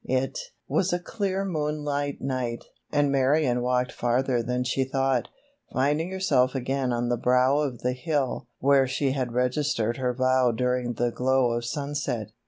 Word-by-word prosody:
It 130 +1 0 0.3
was 170 +7 +1
a 175 - +2
clear 195 +1 -2
moonlight 150 -4 -2
night, 125 -3 -3 0.3
and 145 -1 +2
Marion 135 -2 +2
walked 125 0 0
farther 125 +1 0
than 125 +2 -1
she 130 +2 0
thought, 135 -1 0 0.4
finding 150 +6 +1
herself 140 -9 +1
again 130 0 -1
on 120 0 -1
the 120 - +1
brow 125 +4 +3
of 135 -6 -2
the 125 +1 0
hill 135 -3 -2
where 135 0 +4
she 135 +1 0
had 130 -3 -2
registered 125 -2 0
her 125 -2 -1
vow 130 -1 +3
during 125 +1 0
the 120 +1 0
glow 130 0 +2
of 120 0 -2
sunset. 140 -5 -3
130 Hz, 160 wpm, -26 LUFS, 125-145 Hz, 0.4 s, where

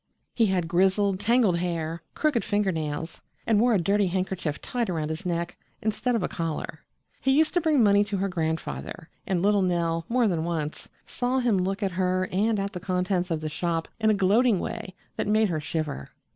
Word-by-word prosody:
He 225 -2 +3
had 180 -3 0
grizzled, 190 +2 +2
tangled 210 -4 +3
hair, 170 -2 -2
crooked 300 -7 +1
finger 205 -2 +1
nails, 160 0 -4 0.2
and 220 -2 +3
wore 235 0 +4
a - - +3
dirty 200 +3 +2
handkerchief 185 -4 -2
tied 245 -5 -2
around 155 -3 -2
his 160 +3 -4
neck, 170 0 -2 0.2
instead 220 +3 0
of 220 - 0
a - - +1
collar. 160 -1 -4 0.4
He 270 - 0
used 315 0 +3
to 350 - +2
bring 305 -6 +3
money 205 -1 +5
to 200 -1 -3
her 195 +1 0
grandfather, 160 -2 -4 0.2
and 185 -2 0
little 205 0 +4
Nell 170 -2 0
more 240 -1 +3
than 170 -5 0
once 160 -3 -3 0.2
saw 250 +1 -1
him 240 -6 +2
look 195 +3 -1
at 195 - 0
her 185 0 0
and 210 +3 +1
at 200 +1 -3
the 180 - -4
contents 180 0 -1
of 160 -2 -1
the 155 - -3
shop 165 +1 -2
in 220 -1 +3
a 215 - +4
gloating 205 +2 +3
way 220 -2 -5 0.2
that - - -1
made 215 0 +3
her 160 -3 -1
shiver. 150 - -4
185 Hz, 200 wpm, -26 LUFS, 170-215 Hz, 0.4 s, money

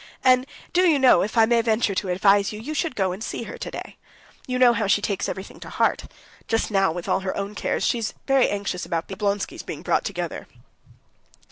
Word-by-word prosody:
And, 255 0 +4 0.3
do 360 - +4
you 305 - +4
know, 265 -2 +5
if 215 +4 -3
I 225 - +7
may 235 0 +3
venture 220 -2 +1
to 190 0 -2
advise 195 +2 +3
you, 210 - -7
you 280 +8 -5
should 315 -2 -2
go 190 -3 0
and 190 +5 -6
see - - -4
her - - -8
today. - - -7 0.5
You 255 -1 -1
know 250 -1 +6
how 215 -3 -1
she 200 - +3
takes 200 -1 -2
everything 190 - -7
to - - -9
heart. - - 0 0.4
Just 225 -1 0
now, 195 -3 +3
with 170 +1 -6
all - - +2
her 190 0 -4
own 200 +1 -3
cares, - - -1
she's 230 -3 -1
anxious 205 -9 +1
about 165 0 -3
the 190 - -5
Oblonskys 200 0 -2
being - - -7
brought - - +1
together." - - -5
210 Hz, 215 wpm, -24 LUFS, 195-240 Hz, 0.5 s, I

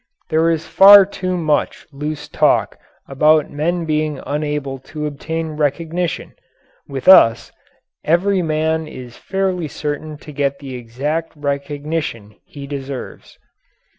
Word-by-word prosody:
There 160 +1 +2
is 165 -1 -1
far 200 0 +8
too 185 -2 -3
much 155 -3 -1
loose 150 +2 -5
talk - - +1 0.3
about 150 +2 +3
men 170 +4 -1
being 155 -2 -1
unable 145 -2 -3
to 150 +3 -7
obtain 160 +2 -4
recognition. 160 +3 -2 0.5
With 135 +2 -6
us 115 -11 +6 0.5
every 185 +4 +2
man 160 0 -1
is 125 -5 -10
fairly 190 -3 -2
certain 150 +1 -5
to 150 - -12
get 140 -1 -1
the 135 -2 -9
exact 135 +7 -4
recognition 145 -5 -4
he 140 -1 -9
deserves. 140 -2 -7
150 Hz, 120 wpm, -18 LUFS, 140-165 Hz, 0.5 s, far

